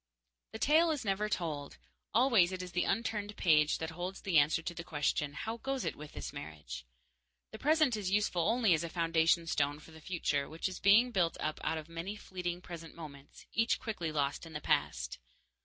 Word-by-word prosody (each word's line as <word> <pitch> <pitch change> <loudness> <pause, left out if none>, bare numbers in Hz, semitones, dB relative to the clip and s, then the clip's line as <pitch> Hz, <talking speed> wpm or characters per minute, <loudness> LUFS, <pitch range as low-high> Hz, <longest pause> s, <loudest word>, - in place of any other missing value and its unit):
_ - - -55
The 220 - -6
tale 315 +7 +4
is 295 -7 -1
never 205 +2 0
told. 155 -7 -3 0.3
Always 230 -7 +5
it 185 -1 -4
is 180 - -8
the 180 +1 +1
unturned 210 -1 -1
page 150 -3 +4
the 160 - -3
holds 180 +3 -5
the 180 -6 +4
answer 150 +3 +2
to 175 - -3
the 170 - -6
question, 150 -2 -1
"How 225 +10 -4
goes 270 +2 -3
it - - -2
with 150 0 -10
this 70 -2 -6
marriage?" 75 -5 -8 0.6
The 220 - -9
present 305 -4 +3
is 205 -3 -2
useful 190 -4 +2
only 225 -5 +4
as 160 +1 +1
a 170 - -4
foundation 165 0 +2
stone 145 -2 0
for 160 - -15
the 160 0 -13
future, 150 -5 -1
which 160 +3 -2
is 185 - -6
being 220 +6 +6
built 175 -6 +1
up 155 - -2
out 160 - 0
of 155 -1 -7
many 165 +5 -5
fleeting 180 -3 -5
present 165 -2 -9
moments, 145 -4 -11
each 225 +1 +2
quickly 210 -9 -3
lost 145 +1 -1
in 160 - -11
the 150 - -3
past. - - 0
175 Hz, 205 wpm, -33 LUFS, 155-210 Hz, 0.6 s, being